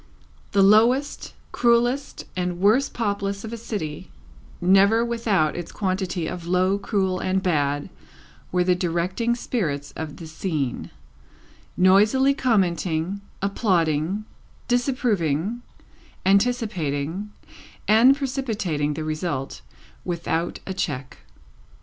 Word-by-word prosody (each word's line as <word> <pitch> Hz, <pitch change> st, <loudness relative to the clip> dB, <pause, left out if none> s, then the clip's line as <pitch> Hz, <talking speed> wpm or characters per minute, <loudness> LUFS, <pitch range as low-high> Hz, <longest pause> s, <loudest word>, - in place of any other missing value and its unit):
The 200 Hz, -1 st, +5 dB
lowest, 235 Hz, +8 st, +3 dB, 0.2 s
cruelest, 240 Hz, +3 st, +1 dB
and 180 Hz, -1 st, -2 dB
worst 220 Hz, +8 st, +3 dB
populace 200 Hz, -3 st, -2 dB
of 225 Hz, +1 st, -6 dB
a -, -, -2 dB
city, 205 Hz, -10 st, -5 dB, 0.5 s
never 195 Hz, +5 st, +4 dB
without 220 Hz, -9 st, +1 dB
its 175 Hz, -, -6 dB
quantity 185 Hz, -3 st, -2 dB
of 170 Hz, +1 st, -5 dB
low, 185 Hz, +2 st, +2 dB
cruel, 190 Hz, -2 st, 0 dB
and 190 Hz, 0 st, 0 dB
bad, 145 Hz, -4 st, 0 dB, 0.6 s
were 180 Hz, 0 st, +2 dB
the 180 Hz, 0 st, +3 dB
directing 180 Hz, +7 st, 0 dB
spirits 155 Hz, -, -3 dB
of 155 Hz, -2 st, -6 dB
the 165 Hz, -, -9 dB
scene: 155 Hz, -5 st, -3 dB, 0.9 s
noisily 210 Hz, +9 st, +5 dB
commenting, 185 Hz, -6 st, 0 dB, 0.2 s
applauding, 185 Hz, -2 st, +1 dB, 0.4 s
disapproving, 235 Hz, -, 0 dB, 0.6 s
anticipating, 195 Hz, -, 0 dB, 0.6 s
and 235 Hz, +6 st, +6 dB
precipitating 215 Hz, -, -2 dB
the 160 Hz, -, -4 dB
result, 155 Hz, -3 st, -3 dB, 0.4 s
without 170 Hz, -1 st, -2 dB
a 190 Hz, -, -4 dB
check. 140 Hz, -8 st, -4 dB
190 Hz, 100 wpm, -24 LUFS, 165-225 Hz, 0.9 s, and